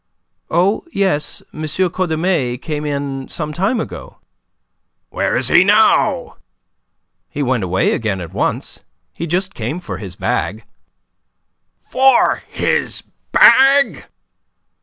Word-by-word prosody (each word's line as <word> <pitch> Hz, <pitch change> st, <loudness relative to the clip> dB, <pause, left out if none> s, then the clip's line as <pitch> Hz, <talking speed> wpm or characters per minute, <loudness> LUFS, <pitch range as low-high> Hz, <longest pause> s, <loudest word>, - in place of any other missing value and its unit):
"Oh, 185 Hz, +6 st, +1 dB
yes, 190 Hz, -, -1 dB
M. 155 Hz, -, -8 dB
Cordemais 170 Hz, -5 st, -1 dB
came 150 Hz, +2 st, -5 dB
in 140 Hz, -2 st, -4 dB
some 150 Hz, -2 st, -4 dB
time 195 Hz, +9 st, 0 dB
ago." -, -, -7 dB, 0.9 s
"Where -, -, 0 dB
is -, -, 0 dB
he -, -, +6 dB
now?" -, -, +2 dB, 0.9 s
"He 145 Hz, -, -3 dB
went 130 Hz, -5 st, 0 dB
away 95 Hz, +1 st, +1 dB
again 105 Hz, -4 st, -2 dB
at 85 Hz, -3 st, -8 dB
once. -, -, -2 dB, 0.3 s
He 170 Hz, -, -5 dB
just 185 Hz, +3 st, -1 dB
came 125 Hz, +7 st, -4 dB
for 180 Hz, -, -7 dB
his 95 Hz, -4 st, -8 dB
bag." 105 Hz, +6 st, -2 dB, 1.3 s
"For 265 Hz, -1 st, +3 dB
his -, -, -1 dB, 0.3 s
bag!" 275 Hz, +1 st, +5 dB
155 Hz, 115 wpm, -17 LUFS, 125-190 Hz, 1.3 s, he